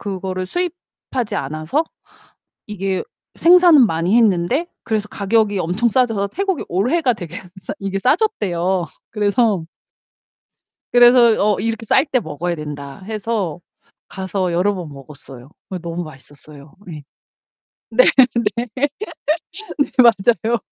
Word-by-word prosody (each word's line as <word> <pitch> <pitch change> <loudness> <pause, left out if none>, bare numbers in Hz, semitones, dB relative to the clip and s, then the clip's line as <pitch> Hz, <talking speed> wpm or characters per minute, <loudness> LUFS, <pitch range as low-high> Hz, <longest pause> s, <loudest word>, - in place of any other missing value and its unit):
그거를 185 -2 -4
수입하지 320 - -4
않아서 155 - -2 0.8
이게 195 -2 -2 0.3
생산은 345 -6 +6
많이 170 +2 0
했는데 225 - +2 0.2
그래서 210 -2 -2
가격이 205 0 +1
엄청 180 +7 0
싸져서 225 -5 +1
태국이 385 - -2
올해가 250 - +1
되게 175 -4 -8 0.3
싸 - - -5
이게 195 0 -2
싸졌대요. 190 - 0 0.2
그래서 210 -3 +1 1.3
그래서 240 -2 +6 0.2
어 - - -3
"이렇게 225 +1 -2
쌀 265 +6 +3
때 265 -4 +1
먹어야 170 0 -4
된다." 145 -3 -8
해서 210 -6 -3 0.5
가서 190 -1 -3
여러 185 +4 +1
번 175 -4 -6
먹었어요. 135 -2 -12 0.2
예 - - -2
너무 170 +1 -5
맛있었어요. 145 -1 -14 0.2
예. 150 -2 -9 0.9
네. - - +5 0.5
네. 235 +1 -2 0.9
네 315 -11 -3
맞아요. 230 -1 +4
200 Hz, 260 characters per minute, -19 LUFS, 170-240 Hz, 1.3 s, 생산은